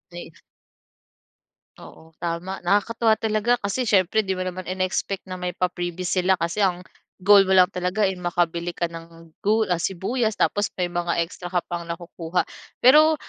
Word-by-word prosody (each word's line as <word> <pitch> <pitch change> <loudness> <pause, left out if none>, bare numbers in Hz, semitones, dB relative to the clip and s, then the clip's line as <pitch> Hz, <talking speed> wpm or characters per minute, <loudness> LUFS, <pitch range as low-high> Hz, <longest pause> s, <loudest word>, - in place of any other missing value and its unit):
Ayu 175 - -8 1.5
Oo, 160 0 -14
tama. 175 +3 -4
Nakakatuwa 220 +2 +2
talaga 220 +2 +1
kasi 230 +3 -2
siyempre 195 +2 +3
'di 190 -2 -2
mo 185 - -3
naman 185 0 -6
in-e-expect 185 +1 -2
na 185 -1 -7
may 180 0 -4
pa-freebies 180 0 -2
sila 190 +1 +3
kasi 170 +4 -2
ang, 180 -2 +1 0.4
goal 200 0 +7
mo 190 - +4
lang 180 +1 +6
talaga, 180 +4 -1
eh, 190 - +2
makabili 175 -1 -1
ka 170 -1 -1
ng 165 0 -12
gul 215 -1 +1
ah, 175 - +1
sibuyas 215 +6 -1
tapos 205 0 +1
may 180 -1 -1
mga 175 -1 0
extra 180 +1 -10
ka 175 -1 0
pang 170 -1 -4
nakukuha. 170 0 -3 0.4
Pero, 305 +5 +7
185 Hz, 165 wpm, -23 LUFS, 175-200 Hz, 1.5 s, goal